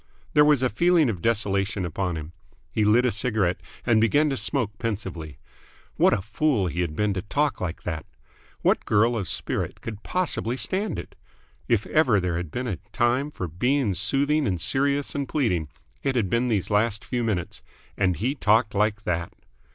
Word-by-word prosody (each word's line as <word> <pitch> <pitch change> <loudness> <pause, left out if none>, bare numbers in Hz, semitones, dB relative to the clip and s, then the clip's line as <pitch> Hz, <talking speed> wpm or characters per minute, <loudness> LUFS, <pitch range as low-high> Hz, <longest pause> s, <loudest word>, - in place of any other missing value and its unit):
There 150 - +6
was 150 -3 +4
a 130 - +3
feeling 160 - +3
of 90 -5 -7
desolation 100 -3 +1
upon 90 0 -2
him. 80 +1 -7 0.4
He 110 - +1
lit 110 +4 +4
a 125 - +2
cigarette 100 -4 0 0.2
and 115 -3 +4
began 145 +7 +3
to - - 0
smoke 110 -8 -1
pensively. 95 - -4 0.6
What - - +4
a 95 - 0
fool 110 0 +1
he 90 0 -2
had 80 -4 -2
been 105 +2 +1
to 95 - -3
talk 145 +8 -1
like 90 -2 -4
that! 80 -3 -4 0.6
What - - +3
girl 115 +3 +3
of 100 -5 -2
spirit - - -2
could 110 -2 -7
possibly 140 -9 0
stand 195 +8 -1
it? - - -7 0.5
If 115 -3 +2
ever 130 -10 +3
there 90 -2 -1
had 85 -2 -4
been 125 +11 -4
a 100 -8 -2
time 125 +4 +1
for 95 -11 -5
being 125 - +1
soothing 140 - +1
and 90 -3 -1
serious 140 - +1
and 140 -2 -3
pleading, 90 - 0 0.3
it 135 -2 -1
had 105 -7 0
been 120 +2 +2
these 105 -6 0
last 105 +1 +1
few 120 -2 -2
minutes. 100 -7 -2 0.3
And 95 -3 +1
he 120 - 0
talked 110 -4 +2
like 105 +1 +1
that! 85 -2 -2
110 Hz, 185 wpm, -25 LUFS, 95-130 Hz, 0.6 s, There